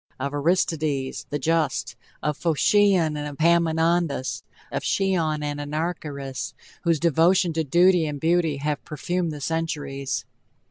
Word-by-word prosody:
of 140 +2 -3
Aristides! 150 -3 0
the 145 - -1
Just 145 -5 0 0.3
of 150 +1 0
Phocion 175 +1 +3
and 145 -1 -5
Epaminondas! 165 -3 +2 0.3
of - - -2
Chillon 165 -6 0
and 145 0 -3
Anarcharchis! 145 -3 -4 0.3
whose 165 -3 +1
devotion 170 +2 +3
to 160 0 0
duty 175 +2 +4
and 145 -1 -4
beauty 165 -1 +2
have 150 +1 -2
perfumed 170 +3 -2
the 150 - -6
centuries! 145 -3 -3
160 Hz, 125 wpm, -24 LUFS, 145-170 Hz, 0.3 s, duty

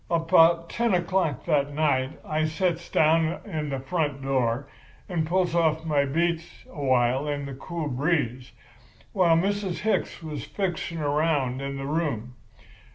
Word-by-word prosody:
"About 165 0 +4
ten 235 -1 +1
o'clock 175 -5 0
that 145 -3 +1
night 140 -3 +1
I 155 0 0
sets 170 +1 -1
down 160 +2 +3
in 155 -7 -3
the 135 -1 -2
front 145 -1 -2
door 130 -1 0 0.4
and 165 -4 -1
pulls 180 0 +1
off 160 -1 +2
my 145 -3 +2
boots 165 +4 -2
a 145 - -6
while 130 +1 +2
in 145 -1 -2
the 140 - -6
cool 160 +4 -5
breeze, 130 -3 -1 0.6
while 175 -4 +4
Mrs. 195 -2 -1
Hicks 220 -5 -1
was 155 -2 -5
fixing 175 -4 -3
around 145 -3 0
in 140 0 -4
the 135 - -5
room. 140 -6 -2
155 Hz, 150 wpm, -26 LUFS, 140-170 Hz, 0.6 s, About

